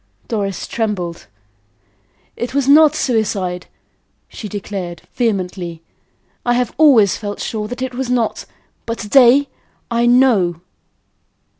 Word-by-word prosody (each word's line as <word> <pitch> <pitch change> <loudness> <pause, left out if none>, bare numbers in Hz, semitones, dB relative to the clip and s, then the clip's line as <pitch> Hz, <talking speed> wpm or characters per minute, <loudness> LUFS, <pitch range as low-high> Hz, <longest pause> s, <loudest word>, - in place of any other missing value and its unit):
Doris 200 -4 -3
trembled. 195 -7 -3 1.1
"It 240 +2 -5
was 280 -2 +1
not 305 +1 +6
suicide," 200 -9 -1 0.6
she 210 - -8
declared, 195 -4 -6
vehemently. 180 -7 -2 0.6
"I 240 0 +1
have 245 -1 -1
always 255 -11 +5
felt 205 -2 -6
sure 215 -2 -3
that 245 +3 -5
it 260 -1 -4
was 255 0 -4
not; 240 -3 -1 0.4
but 230 0 -3
to 210 - -7
day 270 +3 +5 0.4
I 235 0 +2
KNOW." 225 -10 +3
225 Hz, 120 wpm, -18 LUFS, 195-250 Hz, 1.1 s, not